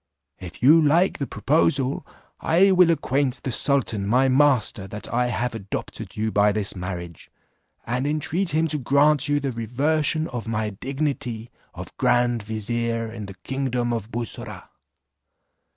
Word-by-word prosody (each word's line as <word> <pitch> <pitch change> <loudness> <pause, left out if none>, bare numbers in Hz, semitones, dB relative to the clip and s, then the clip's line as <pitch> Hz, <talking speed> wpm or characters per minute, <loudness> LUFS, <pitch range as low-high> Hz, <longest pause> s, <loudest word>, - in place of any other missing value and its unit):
If 90 +4 -10
you 155 +5 +7
like 165 +5 +2
the 140 - -2
proposal, 140 -2 0 0.3
I 185 +5 +4
will 180 -2 +5
acquaint 135 -5 0
the 130 - -2
sultan 115 -7 +1
my 130 +5 +3
master 130 -8 +2
that 105 +3 -7
I 125 +1 +1
have 120 +1 -2
adopted 100 -3 -6
you 110 +1 -1
by 105 0 +3
this 105 -1 -2
marriage, 90 -2 -7 0.6
and 125 +4 -2
intreat 160 +5 -1
him 160 0 +1
to 150 - -1
grant 140 +2 +3
you 145 0 +1
the 135 -2 -3
reversion 145 +7 0
of 120 -3 -6
my 110 -1 -2
dignity 130 -1 -4 0.2
of - - -9
grand 120 -1 +2
vizier 115 +1 -3
in 110 -3 -7
the 100 - -10
kingdom 125 -3 -2
of 110 -2 -4
Bussorah. 120 -1 -5
125 Hz, 150 wpm, -23 LUFS, 110-145 Hz, 0.6 s, you